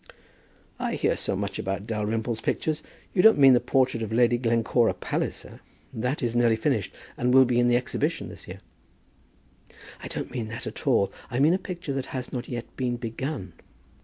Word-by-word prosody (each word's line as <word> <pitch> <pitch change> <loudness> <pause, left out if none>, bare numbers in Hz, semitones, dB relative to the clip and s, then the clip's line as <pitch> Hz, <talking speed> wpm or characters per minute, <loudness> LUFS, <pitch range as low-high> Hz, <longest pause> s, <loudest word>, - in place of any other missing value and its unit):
"I - - -1
hear - - +1
so - - -1
much - - -3
about 95 +1 -3
Dalrymple's 110 +1 -2
pictures! 155 -1 -1 0.3
You 180 - +4
don't 220 +3 +7
mean 135 -2 +8
the 125 - +5
portrait 130 -3 +1
of 110 -1 -4
Lady 120 +1 +3
Glencora 115 0 +2
Palliser? - - -4 0.3
That 125 +5 -2
is 120 -1 -1
nearly 120 -2 +4
finished, 110 -3 0 0.3
and 125 +1 +1
will 130 +1 +7
be 120 -1 +1
in 120 - +4
the 120 0 +4
Exhibition 125 -2 -2
this - - -11
year." - - -9 1.4
"I - - -6
don't - - -5
mean 120 -4 -3
that 115 +1 -6
at - - -6
all. 100 -1 +3 0.2
I 125 - -3
mean 150 +6 +5
a 185 - +1
picture 180 -6 -5
that 135 -1 -3
has 130 -1 -5
not 125 -1 -4
yet 120 -1 -6
been 125 -2 -1
begun." 120 - -5
120 Hz, 190 wpm, -26 LUFS, 115-130 Hz, 1.4 s, mean